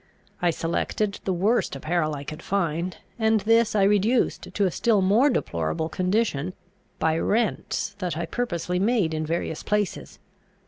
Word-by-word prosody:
I 175 - +3
selected 170 +5 -1
the 190 - +1
worst 195 - +1
apparel 155 +1 -1
I 140 - -6
could 155 +3 -7
find; 175 -2 -1 0.2
and 220 -1 +3
this 225 +2 +3
I 200 - +4
reduced 210 +5 +2
to 205 - +1
a 185 - +1
still 220 +4 +2
more 220 +10 +4
deplorable 85 - -1
condition, 185 -3 0 0.4
by 160 0 +1
rents 225 +4 0
that 180 -5 -2
I 170 - -2
purposely 180 -4 -2
made 200 -5 +2
in 155 0 -2
various 165 -1 -2
places. 210 -2 -2
185 Hz, 150 wpm, -25 LUFS, 160-215 Hz, 0.4 s, I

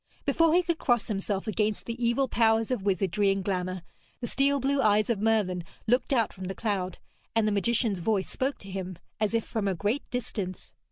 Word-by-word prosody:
Before 330 -1 +3
he 360 - +4
could 340 -1 -1
cross 240 -2 +1
himself 195 -1 -2
against 215 -1 -1
the 235 +1 -4
evil 235 +3 +2
powers 225 -1 +2
of 250 - 0
wizardry 195 0 +1
and 195 0 0
glamour, 185 -2 -2 0.4
the - - -3
steel 275 +3 +2
blue 275 +1 +1
eyes 215 0 +3
of 220 - 0
Merlin 210 -5 +1 0.2
looked 245 +5 +2
out 235 -5 +2
from 190 -1 -7
the 190 +1 -4
cloud, 190 -5 -2 0.4
and 225 -1 +3
the - - +2
magician's 205 0 +1
voice 195 +1 0
spoke 270 +2 -2
to 195 - -9
him 185 -2 -5 0.2
as 215 +1 +1
if 225 - +1
from 215 -3 -2
a 190 - +1
great 210 - -1
distance. 210 -6 -4
215 Hz, 205 wpm, -28 LUFS, 195-240 Hz, 0.4 s, he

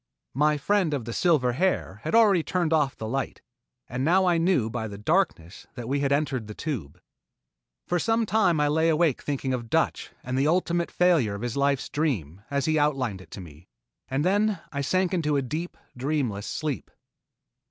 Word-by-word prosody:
My 150 +3 +2
friend 175 0 +1
of 125 -5 -4
the 115 - -5
silver 145 -7 +2
hair 130 - -1
had 160 - -1
already 210 -6 +5
turned 170 -1 0
off 150 -4 +1
the 110 - -5
light, 135 +4 -3 0.4
and 125 +1 -3
now 185 +5 +4
I 175 -2 +3
knew 165 -9 +2
by 110 -1 -3
the 100 -1 -8
darkness 105 - -1
that 120 -2 -6
we 140 +3 0
had 140 -1 0
entered 135 -6 0
the 105 - -8
Tube. 115 - -5 0.9
For 175 - 0
some 225 +4 +1
time 200 -7 +2
I 150 - +3
lay 160 +2 +2
awake 160 -3 +2
thinking 135 -2 -2
of 120 -2 -4
"Dutch" - - 0
and 130 +1 -2
the 140 - +2
ultimate 170 0 +1
failure 165 - +2
of 100 - -7
his 120 -1 -3
life's 140 -1 +1
dream, 100 - -2
as 140 -1 0
he 155 0 +2
had 145 - +4
outlined 125 -10 -2
it - - -16
to 95 - -8
me, 80 -1 -14 0.4
and 135 +4 -1
then 205 +2 +2
I 140 - -2
sank 185 +6 +1
into 150 -5 +1
a 140 - 0
deep, 160 +7 -5 0.2
dreamless 125 -6 -2
sleep. 150 -3 -3
145 Hz, 195 wpm, -26 LUFS, 125-170 Hz, 0.9 s, already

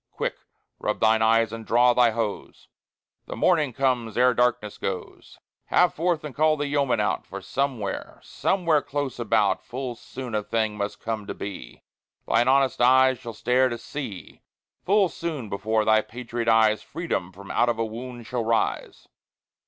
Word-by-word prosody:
Quick, - - -3 0.4
rub - - -2
thine 110 0 +3
eyes 115 0 +3
and 115 0 -6
draw 120 +2 +4
thy 120 -1 +5
hose: 110 -2 -4 0.6
The - - -6
Morning 150 -4 +2
comes 125 -3 -1
ere 125 +1 +5
darkness 120 -4 0
goes. 95 -2 -6 0.3
Have 180 -2 +3
forth 170 -1 0
and 150 -3 -6
call 155 +2 +2
the 145 - -2
yeomen 140 -5 +1
out, 105 - 0
For 100 - -7
somewhere, 110 0 -3
somewhere 170 -6 +1
close 140 -3 -4
about 110 -4 +1
Full 125 0 -5
soon 125 +1 -8
a 105 - +1
Thing 110 0 -1
must 100 0 -4
come 110 -2 -4
to - - -5
be 100 -1 -8 0.4
Thine 120 +2 +3
honest 135 -1 +3
eyes 130 +1 +5
shall 120 -3 -8
stare 125 +3 +2
to 120 - -4
see 120 -5 -8 0.4
Full 200 0 +4
soon 155 -10 -5
before 110 +2 0
thy 110 0 +4
patriot 120 0 -5
eyes 110 -2 +4
Freedom 145 - -4
from 95 +1 -10
out 120 - +2
of 115 - 0
a 115 - 0
Wound 120 +2 -8
shall 125 0 -2
rise. 115 0 -1
120 Hz, 170 wpm, -25 LUFS, 110-130 Hz, 0.6 s, thy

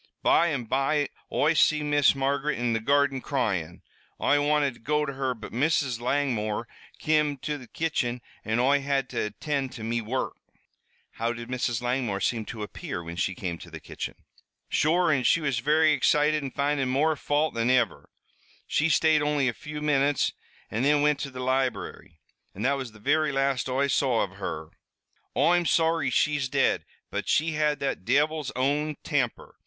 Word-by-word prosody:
By 170 - +4
an' 140 -7 -1
by 135 +5 0 0.2
Oi 155 +3 +2
see 150 0 +3
Miss 145 -2 +3
Margaret 140 +2 0
in 120 -1 0
the 115 - +1
garden 140 +2 +2
cryin'. 100 - -2 0.4
Oi 145 0 +3
wanted 145 -2 +2
to - - -18
go 150 +4 0
to 140 - -4
her, 135 -1 -2
but 110 - -9
Mrs. 135 -2 0
Langmore 120 -5 -1 0.3
kim 150 -2 +1
to 150 -1 -2
the 125 - -12
kitchen 125 -7 -2 0.2
an' 110 +2 0
Oi 140 +3 +3
had 135 -2 -1
to 120 - -2
attind 135 +4 -3
to 115 - -8
me 115 +1 -1
wurruk." 120 +4 -2 0.8
"How 115 +1 -2
did 120 0 -8
Mrs. 125 -2 -1
Langmore 120 -5 -1
seem 110 +3 -1
to 110 -1 -6
appear 90 -3 -6
when 85 +1 -7
she 95 +1 -1
came 85 -3 -4
to - - -11
the - - -8
kitchen?" - - -6 0.5
"Sure 170 +2 +2
an' 135 -4 +2
she 170 - +4
was 140 -6 -1
very 155 +4 +3
excited 150 +1 +2
an' 135 - -3
findin' 140 -1 0
more 150 +5 +2
fault 150 +2 0
than 115 +1 0
iver. 125 -3 +1 0.6
She 155 +2 +1
stayed 155 -1 +4
only 150 -2 +1
a 125 - 0
few 150 +5 -7
minutes, 145 -1 +2 0.4
an' 110 - -1
thin 145 +2 +3
wint 150 -1 +3
to 145 - -4
the 130 -1 -6
library, 125 -10 -2 0.4
an' 100 - -5
that 135 - +3
was 130 -5 -5
the 110 - -15
very 150 +6 +2
last 135 -2 0
Oi 135 +2 +1
saw 130 -4 +2
av 100 0 -7
her. 80 -5 -5 0.7
Oi'm 170 +5 +3
sorry 165 -3 +2
she's 140 +1 +1
dead, - - +1 0.3
but - - -3
she 160 +2 +2
had 150 -1 +1
that 135 -8 -2
divil's 145 +5 +1
own 145 +4 0
temper!" 135 -7 -2
135 Hz, 180 wpm, -27 LUFS, 120-150 Hz, 0.8 s, By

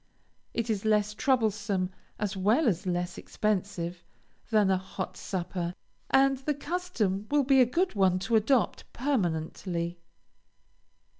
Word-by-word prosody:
It 230 -1 0
is 205 -2 -1
less 210 -1 +2
troublesome, 210 -6 +1 0.3
as 210 -1 -2
well 215 +10 +3
as 185 -2 0
less 175 0 -2
expensive, 185 -4 -2 0.5
than 210 -4 +4
a 190 - +3
hot 185 0 -6
supper, 175 -1 -3 0.3
and 270 0 +4
the 290 +2 -1
custom 285 - -2
will 290 -1 +3
be 270 0 +5
a 250 - +5
good 355 +9 +1
one 190 -3 +3
to 210 +4 +1
adopt 225 +3 +2
permanently. 175 - -1
210 Hz, 130 wpm, -29 LUFS, 185-250 Hz, 0.5 s, be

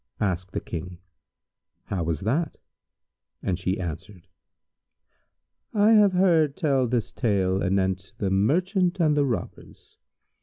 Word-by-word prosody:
Asked 90 -2 -2
the - - -1
King, 90 +1 -7 0.9
"How 95 - -3
was 80 -2 -2
that?" 145 - -1 0.9
and 90 -2 -1
she 95 0 -1
answered, 85 +2 -7 1.5
"I 210 +1 +5
have 210 -3 +5
heard 165 -6 +3
tell 140 -7 +1
this 120 -1 -1
tale 95 -5 0
anent 95 0 -1
The 95 -2 -1
Merchant 180 - +1
and 155 -3 +3
the 145 -1 +2
Robbers. 120 -5 -6
105 Hz, 120 wpm, -25 LUFS, -, 1.5 s, I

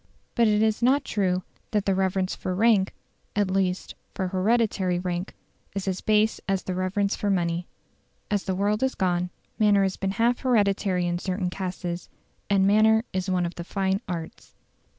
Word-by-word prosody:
But 235 -1 +3
it 210 0 +3
is 220 +1 +1
not 265 +4 +3
true 185 -3 0 0.3
that 210 -2 0
the 195 - +2
reverence 190 0 0
for 185 - -3
rank 205 -2 +3 0.4
at 205 -2 +1
least, 185 -1 0 0.2
for 190 -2 -1
hereditary 195 -2 +1
rank 180 0 -3 0.4
is 195 -1 -3
as 190 -1 -1
base 215 +1 +2
as 195 -1 +1
the 185 - -3
reverence 195 +2 0
for 205 - -2
money. 175 -2 0 0.6
As 205 -2 0
the 190 - -1
world 205 +3 +1
has 265 0 +1
gone, 180 -1 0 0.3
manner 205 -2 +5
has 190 -1 -1
been 195 - -1
half 235 +3 +2
hereditary 200 -6 +2
in 175 0 -1
certain 185 -1 -2
castes, 180 -2 -4 0.4
and 195 -1 +4
manner 220 +2 +5
is 190 0 -2
one 180 -1 +1
of 170 - -4
the 170 - -6
fine 195 +2 -1
arts. 165 -2 -6
195 Hz, 175 wpm, -26 LUFS, 180-210 Hz, 0.6 s, manner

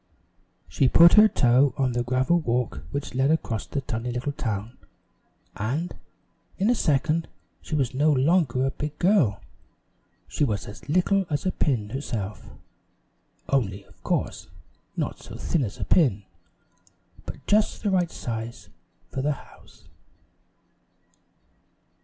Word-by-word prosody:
She 130 - +2
put 170 +4 +8
her 215 0 +8
toe 130 - +3
on 130 -2 +1
the 120 0 -1
gravel 130 +8 +2
walk 120 - -1
which 140 +6 -4
led 130 +2 +2
across 125 -8 -1
the 140 - -3
tiny 115 -1 -4
little 125 +4 -2
town, 110 -3 -4 0.8
and, 140 +12 -2 0.6
in 200 +5 +2
a - - +5
second 155 - +1 0.3
she 155 - -4
was 135 -4 0
no 150 +4 +3
longer 135 -2 +2
a 135 - 0
big 150 +1 -5
girl; 175 - +3 0.9
she - - -1
was 105 -8 -1
as 105 +7 -11
little 185 +3 +2
as 145 +2 -2
a 185 - +2
pin 110 -12 -1
herself, 110 -7 -5 1.0
only, 100 -8 0
of - - -24
course, - - -2 0.5
not - - -2
so - - -10
thin 160 - 0
as 105 - -5
a - - -3
pin, 125 - +3 1.0
but - - -8
just 210 +2 +2
the 205 - +1
right 180 -3 +2
size 115 -3 -6 0.4
for 135 - -3
the 150 +2 +1
house. - - -17
135 Hz, 140 wpm, -25 LUFS, 120-160 Hz, 1.0 s, put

